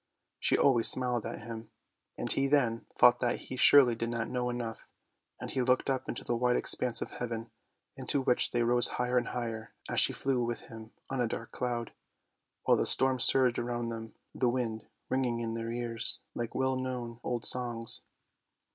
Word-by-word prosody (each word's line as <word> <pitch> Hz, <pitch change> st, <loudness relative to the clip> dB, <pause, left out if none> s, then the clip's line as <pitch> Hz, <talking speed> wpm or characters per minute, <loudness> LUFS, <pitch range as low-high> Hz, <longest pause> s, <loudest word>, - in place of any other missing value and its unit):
She -, -, +2 dB
always 120 Hz, -5 st, +5 dB
smiled 125 Hz, 0 st, +5 dB
at -, -, -8 dB
him, 115 Hz, 0 st, -9 dB, 0.5 s
and -, -, 0 dB
he 135 Hz, 0 st, +2 dB
then 125 Hz, -5 st, 0 dB
thought 125 Hz, 0 st, +5 dB
that 120 Hz, -1 st, 0 dB
he -, -, -9 dB
surely 130 Hz, -1 st, +6 dB
did 115 Hz, 0 st, -4 dB
not 115 Hz, -1 st, -4 dB
know 125 Hz, -1 st, -2 dB
enough, 120 Hz, -2 st, -6 dB, 0.5 s
and -, -, -7 dB
he 130 Hz, -, -1 dB
looked 130 Hz, +2 st, +1 dB
up 130 Hz, -, -4 dB
into -, -, -5 dB
the 120 Hz, -, -2 dB
wide 125 Hz, +1 st, +1 dB
expanse 120 Hz, -2 st, +2 dB
of -, -, -11 dB
heaven, 115 Hz, -1 st, -6 dB, 0.4 s
into 140 Hz, -, -1 dB
which 125 Hz, -, +4 dB
they 120 Hz, -1 st, -1 dB
rose 120 Hz, +1 st, +3 dB
higher 125 Hz, 0 st, +1 dB
and 120 Hz, -, -6 dB
higher 115 Hz, -2 st, -6 dB
as -, -, 0 dB
she -, -, +6 dB
flew 130 Hz, -3 st, -1 dB
with 120 Hz, 0 st, -4 dB
him 110 Hz, -1 st, -12 dB, 0.2 s
on 135 Hz, -2 st, -2 dB
a 120 Hz, -, 0 dB
dark 115 Hz, 0 st, -7 dB
cloud, 120 Hz, -2 st, -4 dB, 0.7 s
while -, -, +3 dB
the -, -, -1 dB
storm 130 Hz, -1 st, +2 dB
surged 125 Hz, 0 st, +5 dB
around 120 Hz, 0 st, -3 dB
them, 115 Hz, -1 st, -8 dB, 0.2 s
the 125 Hz, -, 0 dB
wind 120 Hz, -3 st, -3 dB, 0.2 s
ringing 125 Hz, -3 st, -1 dB
in 115 Hz, -1 st, -4 dB
their 115 Hz, 0 st, -5 dB
ears 120 Hz, -1 st, 0 dB
like 120 Hz, -1 st, -6 dB
well 130 Hz, 0 st, 0 dB
known 125 Hz, -2 st, -5 dB
old 120 Hz, -2 st, -4 dB
songs. 120 Hz, -2 st, 0 dB
120 Hz, 190 wpm, -30 LUFS, 115-125 Hz, 0.7 s, surely